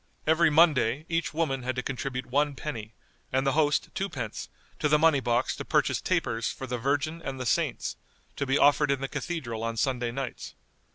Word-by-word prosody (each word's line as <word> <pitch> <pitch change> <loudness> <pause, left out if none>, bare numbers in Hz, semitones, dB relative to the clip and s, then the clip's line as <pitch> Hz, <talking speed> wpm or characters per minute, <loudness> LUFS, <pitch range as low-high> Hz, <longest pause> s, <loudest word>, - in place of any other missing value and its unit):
Every 160 +1 +4
Monday 150 -4 +4
each 165 0 0
woman 150 -5 -1
had 130 0 -2
to 125 - -2
contribute 130 -1 -3
one 145 +3 +1
penny, 110 -7 -6 0.4
and 130 +1 +1
the 135 - +3
host 150 0 +2
twopence, 145 - -4 0.3
to 150 - +1
the 150 - +5
money 155 -2 +4
box 120 0 0
to - - -4
purchase - - +1
tapers 115 0 0
for 135 - -7
the 125 -1 -3
Virgin 145 +6 -1
and 135 -1 -5
the 125 - -3
saints, - - 0 0.4
to 140 - -2
be 135 +2 +3
offered 145 0 +4
in 140 -1 +1
the 135 - -1
Cathedral 125 -10 -4
on 115 0 -2
Sunday 120 0 0
nights. 135 +1 -5
135 Hz, 190 wpm, -28 LUFS, 125-150 Hz, 0.4 s, the